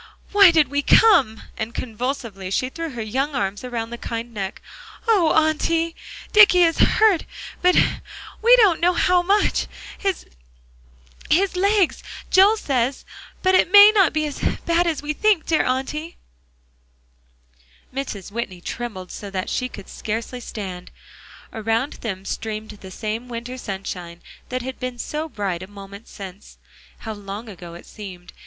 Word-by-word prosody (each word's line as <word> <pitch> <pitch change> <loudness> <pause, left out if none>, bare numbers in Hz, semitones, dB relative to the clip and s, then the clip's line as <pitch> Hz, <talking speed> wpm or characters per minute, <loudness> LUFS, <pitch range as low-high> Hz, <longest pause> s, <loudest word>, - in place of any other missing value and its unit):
Why 400 -2 +8
did 315 -5 +3
we 285 +1 0
come!" 285 - +4
And 220 +1 -5
convulsively 230 -5 -4
she 255 +6 0
threw 330 +4 -5
her 240 -5 -5
young 270 +7 -2
arms 200 -3 -2
around 235 -2 -4
the 235 - -7
kind 230 +1 -5
neck. 195 -3 -5 0.5
"Oh, 390 -8 +4
Auntie! 325 +1 +1 0.4
Dicky 405 -4 +7
is 330 -1 +2
hurt 430 -6 +4 0.4
but 360 0 +4 0.7
we 475 +3 +7
don't 415 -9 +4
know 355 +1 +3
how 360 +1 +3
much 400 +4 +1 0.3
his 390 -3 -2 1.3
legs, 395 -1 +2 0.3
Joel 400 +4 +6
says, 260 - -1 0.4
but 375 0 +3
it 370 -1 +4
may 410 +1 +10
not 390 -6 +4
be 310 0 0
as 295 - -5 0.3
bad 340 +1 +2
as 320 -3 -2
we 300 +1 -2
think; 415 0 +2
dear 320 - +2
Auntie." 285 +6 -3 1.8
Mrs. 220 -8 -5
Whitney 210 -5 -4
trembled 190 -2 -6
so 205 - -7
that 190 -1 -4
she 255 - -1
could 200 -5 -11
scarcely 225 +3 -5
stand. 190 -6 -7 0.6
Around 225 +5 -1
them 195 -4 -5
streamed 215 0 -5
the 200 -2 -12
same 220 +5 -5
winter 240 +1 -6
sunshine 185 -6 -7 0.3
that 255 -1 -3
had 260 0 -6
been 255 -1 -4
so 305 +6 -4
bright 195 - -3
a 185 - -8
moment 200 +1 -12
since. 195 0 -11 0.4
How 220 - -5
long 205 +2 -8
ago 175 -4 -10
it 170 - -12
seemed. 180 -4 -10
250 Hz, 150 wpm, -22 LUFS, 205-330 Hz, 1.8 s, may